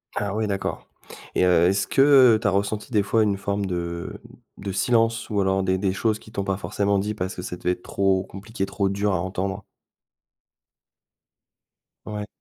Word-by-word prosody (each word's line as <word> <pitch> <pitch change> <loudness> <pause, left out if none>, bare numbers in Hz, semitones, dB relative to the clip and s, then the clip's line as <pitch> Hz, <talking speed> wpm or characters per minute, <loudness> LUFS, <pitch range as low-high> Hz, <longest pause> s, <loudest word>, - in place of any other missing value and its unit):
Ah 100 -1 -2
oui, 110 0 0
d'accord, 100 -1 -3 0.5
et - - +3
heu, 90 -1 +5
est-ce 95 +1 +1
que 135 -5 +6
tu 110 - +1
as - - +5
ressenti, 100 +4 -2
des 105 -4 +3
fois, 110 +3 +2
une 100 -2 +1
forme 100 +1 -2
de 85 -2 -4 0.4
de 100 0 -5
silence 115 +3 +1
ou 105 -2 0
alors 95 0 +1
des 95 0 +1
des 95 -1 0
choses 110 +1 0
qui 110 - -16
t'ont 100 -3 -2
pas 95 -1 -1
forcément 100 0 0
dit, 105 +2 -1
parce 95 -2 -4
que - - -6
ça 90 - -5
devait 90 - 0
être 90 - -5
trop 95 -1 +1
compliqué, 100 +2 -5
trop 100 0 -1
dur 100 +1 0
à 90 - 0
entendre? 95 +2 -3 2.4
Ouais. 105 -1 -5
100 Hz, 190 wpm, -24 LUFS, 95-105 Hz, 2.4 s, que